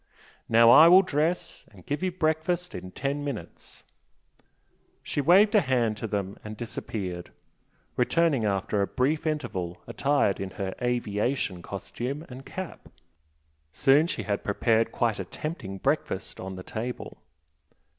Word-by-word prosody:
Now 115 +1 +7
I 155 +6 +9
will 185 +3 +8
dress, 165 +1 -1
and 95 -4 -17
give 145 +4 -2
you 185 -1 0
breakfast 170 +1 -1
in 90 +1 -7
ten 140 +8 -3
minutes." 140 -6 -7 1.2
She 145 - -1
waved 190 - +5
a 210 - +6
hand 125 - +1
to 115 - -4
them 100 -2 -3
and 110 0 -7
disappeared, 95 -6 -5 0.6
returning 145 0 +2
after 100 0 0
a 100 - +1
brief 150 +5 0
interval 105 - -3
attired 140 -8 +1
in 95 - -3
her 95 -2 -3
"aviation" 120 -4 -1
costume 135 - -5
and 130 +1 -10
cap. 190 -2 -7 0.8
Soon 145 - +4
she - - -3
had 100 -1 -2
prepared 115 +2 +1
quite 115 -4 0
a - - -2
tempting 115 - -6
breakfast - - -2
on 95 0 -6
the 95 - -8
table. 120 +6 -6
125 Hz, 140 wpm, -27 LUFS, 100-155 Hz, 1.2 s, I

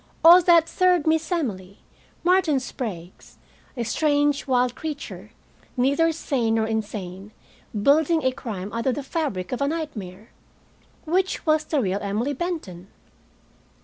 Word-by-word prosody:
Or 345 +2 +10
that 340 -2 +5
third 365 -4 +2
Miss 320 0 +1
Emily, 200 - -3 0.5
Martin 350 -6 +3
Sprague's, 190 -9 -7 0.4
a 240 - -1
strange 290 +3 +1
wild 250 -1 +2
creature, 215 - -7 0.5
neither 280 +6 +3
sane 255 -8 -1
nor 220 -1 +1
insane, 205 -3 -5 0.5
building 315 +4 +3
a 260 - +2
crime 210 -6 -6
out 230 +2 -2
of 260 - +2
the 290 - -4
fabric 270 - -3
of 250 - -3
a 280 - +2
nightmare? 225 - -6 0.7
Which 370 +4 0
was 310 -1 +2
the 305 - 0
real 195 -2 -1
Emily 215 +8 -1
Benton? 260 - -5
270 Hz, 135 wpm, -24 LUFS, 210-315 Hz, 0.7 s, Or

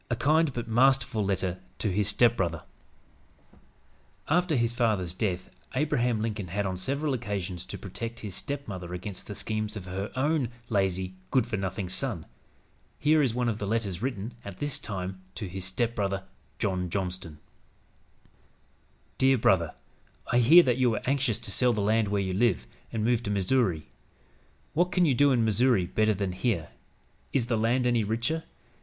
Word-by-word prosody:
A 120 - +1
KIND 155 +4 +3
BUT 120 -2 -4
MASTERFUL 120 -1 +3
LETTER 95 -2 -1 0.2
TO 105 - -1
HIS 100 +2 +1
STEPBROTHER 100 -7 +2 1.6
After 175 0 +2
his 120 -2 +1
father's 105 -8 +1
death 95 -2 -2 0.2
Abraham 125 -6 +1
Lincoln 105 -4 -3
had, 100 +4 -2
on 95 -1 -1
several 140 +10 -1
occasions, 100 -7 -3
to - - -6
protect 115 +4 -6
his 105 -3 -6
stepmother 95 - -5
against 95 +1 -7
the 105 - -6
schemes 110 0 -2
of 100 -4 -6
her 95 +3 -4
own 140 -1 +1 0.2
lazy, 95 -3 0 0.2
good 130 -4 +3
for 115 - -3
nothing 95 -1 -3
son. 90 - -2 0.7
Here 155 +1 +4
is 125 -5 +1
one 125 -1 +1
of 110 -2 -1
the 100 - -3
letters 100 -4 -1
written, 120 -3 -3
at 100 -2 -8
this 145 -2 -3
time, 95 -2 -5
to 105 - -4
his 90 +1 -5
stepbrother, 100 -1 -1 0.3
John 90 -3 -1
Johnston: 90 -4 -4 1.8
"DEAR 135 0 +5
BROTHER: 90 -7 +2 0.6
I 120 - +4
hear 160 +9 +8
that 125 -4 +2
you 130 -1 +4
were 110 -2 -1
anxious 135 -4 +1
to - - -4
sell 125 +3 +3
the 105 - -1
land 110 +1 +2
where 100 0 0
you 95 -1 -2
live, 110 - +2 0.3
and 110 -1 -1
move 120 -1 +2
to 105 - -4
Missouri. 100 -4 +1 0.9
What 175 +3 +2
can 180 -2 +3
you 145 - +4
do 140 +3 +4
in 120 -3 +3
Missouri 110 -2 +3
better 110 +4 +2
than 95 -1 -1
here? 90 -3 -1 0.6
Is 130 -4 +2
the 120 -1 0
land 115 +3 +2
any 120 -2 +3
richer? 115 +10 -1
110 Hz, 170 wpm, -28 LUFS, 95-125 Hz, 1.8 s, hear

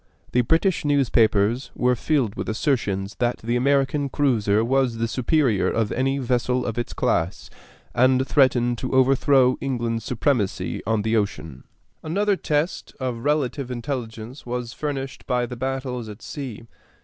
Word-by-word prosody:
The 125 - +3
British 165 - +2
newspapers 120 -5 +2
were 125 0 +2
filled 130 -4 0
with - - -5
assertions 105 -5 -1
that 120 0 +1
the 120 +2 0
American 140 +2 +1
cruiser 115 -7 +2
was 130 -2 +1
the 115 0 0
superior 125 -2 +1
of 115 -2 0
any 135 +2 0
vessel 125 -1 0
of 115 0 -2
its 120 - -3
class, 85 +4 -1 0.4
and 130 +1 +3
threatened 120 -4 +3
to 130 - -4
overthrow 130 0 +4
England's 120 -4 -2
supremacy 120 -4 -1
on 110 -2 +1
the 110 +1 +1
ocean. 80 - -3 0.4
Another 200 +6 +1
test 155 -1 -2
of 125 -3 -3
relative 145 -3 0
intelligence 120 0 -5
was 120 -1 -4
furnished 135 -3 -5
by 125 -2 +1
the 125 - -7
battles 130 -2 -3
at 105 +1 -10
sea. 130 -7 -6
125 Hz, 145 wpm, -23 LUFS, 115-135 Hz, 0.4 s, overthrow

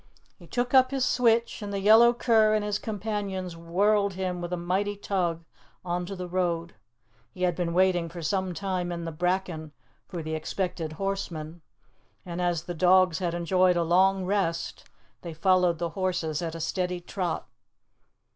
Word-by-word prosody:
He 175 - -16
took 245 +6 -2
up 260 -1 +6
his 270 -2 0
switch, 235 -2 +2
and 205 -1 -5
the 200 - -2
yellow 220 +4 +7
cur 225 -3 +3
and 210 -1 0
his 210 0 -1
companions 200 -4 -4
whirled 200 +5 +1
him 185 -1 -3
with 175 0 -5
a 180 - -1
mighty 190 +4 -1
tug 175 -5 -2 0.4
on 175 0 -2
to 195 - -5
the 180 -1 -5
road. 170 -2 -1 0.6
He 180 - -6
had 175 -2 +2
been 175 -1 -1
waiting 180 -1 +2
for 170 0 -8
some 185 +2 -1
time 185 -2 -2
in 170 -1 -4
the 165 - -4
bracken 175 -2 -2 0.3
for 175 -4 -6
the 160 0 -4
expected 160 0 -3
horseman, 175 -3 -4 0.6
and 175 0 -4
as 175 -2 0
the 175 - -5
dogs 185 0 +4
had 175 -2 -1
enjoyed 180 +1 +2
a 170 - +2
long 190 +3 +3
rest, 185 -4 -1 0.4
they 170 -2 -7
followed 180 0 +3
the 170 +1 -2
horses 175 -4 -2
at 165 -1 -4
a - - -6
steady 180 +2 -2
trot. 175 0 -3
180 Hz, 175 wpm, -27 LUFS, 170-195 Hz, 0.6 s, yellow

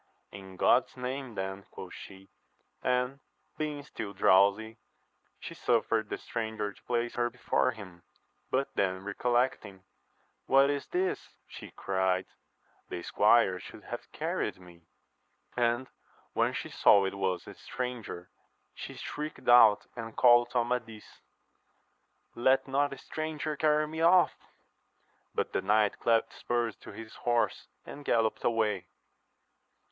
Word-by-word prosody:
In 95 -1 -11
God's 125 +6 +3
name 130 -1 -5
then, 95 0 -4
quoth 90 - -9
she; 95 0 -12 0.5
and, 125 +2 0 0.4
being 150 -2 -3
still 110 -7 -7
drowsy, 100 +4 +3 0.6
she - - -8
suffered 115 -2 +1
the - - -3
stranger 110 -3 -4
to - - -23
place 120 -1 -1
her 120 0 0
before 125 +1 0
him; 100 -7 -9 0.5
but 135 +1 -1
then 95 -1 -1
recollecting. 105 -2 -1 0.6
What 135 +1 +5
is 140 -1 -3
this 185 +1 0 0.2
1 - - -40
she - - -10
cried: 95 -1 0 0.6
the 85 - -5
squire 105 -3 +4
should - - -12
have - - -8
carried - - -3
me. 85 -2 -17 0.7
And 120 +1 +1 0.5
when - - +1
she - - -4
saw 100 -1 +5
it 95 - -2
was 95 -2 -2
a - - -9
stranger, 125 -8 -6 0.4
she - - -8
shrieked 150 +1 -6
out 115 -4 +7
and 115 -2 -7
called 120 -1 +6
to 125 - -2
Amadis, 115 -3 -5 1.1
Let 130 +3 +2
not 140 +2 +1
a 140 - -7
stranger 155 -1 -4
carry 150 0 +2
me 160 +1 -5
off! 175 +2 +5 1.0
But - - -1
the - - 0
knight 105 +1 +2
clapt 115 -1 +2
spurs 120 -2 -2
to - - -12
his 110 -1 -10
horse, 120 -1 0 0.2
and 145 - -9
gallopped 115 -4 +1
away. 105 -6 0
115 Hz, 135 wpm, -30 LUFS, 100-130 Hz, 1.1 s, out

